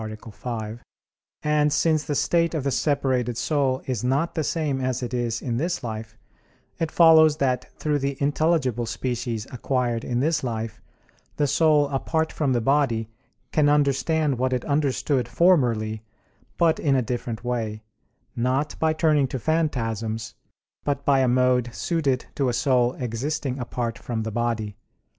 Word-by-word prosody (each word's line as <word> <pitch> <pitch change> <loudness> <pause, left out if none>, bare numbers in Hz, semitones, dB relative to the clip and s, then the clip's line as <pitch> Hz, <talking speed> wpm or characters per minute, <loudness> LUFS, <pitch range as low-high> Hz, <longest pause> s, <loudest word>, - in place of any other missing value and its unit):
5), 110 0 -6 0.6
and 150 0 +2
since 155 +1 +2
the 145 +1 -3
state 170 +3 +1
of 150 - -1
the 140 - 0
separated 130 -5 0
soul 135 -3 0
is 125 -4 -2
not 140 +7 +1
the 160 - -1
same 145 -3 -1
as 130 -1 -1
it 120 0 -4
is 120 -2 -2
in 120 -3 -1
this 170 +4 -2
life, 110 -1 -6 0.6
it 165 - 0
follows 160 -2 +6
that 130 -3 -1
through 150 -1 0
the 140 0 -2
intelligible 140 -5 +1
species 120 -3 -3
acquired 125 -2 -1
in 120 -1 -1
this 155 +3 +1
life 115 -2 -4 0.6
the 150 - +2
soul 150 0 +3
apart 160 +3 -1
from 145 -4 0
the 120 - +2
body 115 -4 +1 0.4
can 150 -2 +3
understand 145 0 +2
what 130 0 +1
it 125 - -2
understood 140 -3 0
formerly, 115 - +2 0.6
but 165 -2 +3
in 140 -3 +2
a 130 - +2
different 120 -1 -4
way; 115 -3 -3 0.5
not 130 +5 0
by 160 -1 +2
turning 155 -3 +2
to 130 - -4
phantasms, 115 -8 -1 0.5
but 140 -1 -2
by 140 -1 +4
a 130 - +3
mode 125 -1 +2
suited 140 -3 -1
to 135 -3 0
a - - -1
soul 125 -1 +2
existing 130 +3 -3
apart 120 -1 -3
from 115 -2 -3
the 110 - -4
body. 115 -2 -2
130 Hz, 155 wpm, -24 LUFS, 120-150 Hz, 0.6 s, follows